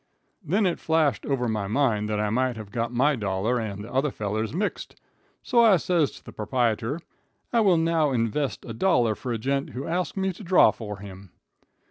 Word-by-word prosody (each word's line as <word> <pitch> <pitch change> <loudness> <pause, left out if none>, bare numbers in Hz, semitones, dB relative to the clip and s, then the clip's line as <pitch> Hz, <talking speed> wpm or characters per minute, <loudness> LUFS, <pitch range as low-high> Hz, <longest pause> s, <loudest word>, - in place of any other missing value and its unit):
"Then 195 +6 +1
it 175 - 0
flashed 155 -8 +1
over 130 -3 0
my 105 -3 -2
mind 110 -3 +1
that 105 -1 -1
I 105 0 0
might 130 +1 +1
have 105 -2 -9
got 115 +1 -2
my 140 +5 +2
dollar 105 +2 -1
and 100 -3 -5
the 115 - -10
other 135 +3 +2
feller's 110 -1 -3
mixed, 200 +6 -3 0.5
so 235 -3 +4
I 215 -5 +6
says 165 -3 +1
to - - -14
the - - -10
proprietor, 120 +5 -1 0.5
'I 235 - +4
will 195 -6 +4
now 165 -2 +2
invest 130 +3 -1
a 115 - -6
dollar 120 - +2
for 120 +4 -6
a 115 - -1
gent 135 +4 -1
who 130 +2 -5
asked 180 +3 -2
me 190 -1 0
to 200 - -11
draw 185 0 +5
for 105 -3 -7
him.' 95 -1 -11
125 Hz, 200 wpm, -25 LUFS, 110-165 Hz, 0.5 s, I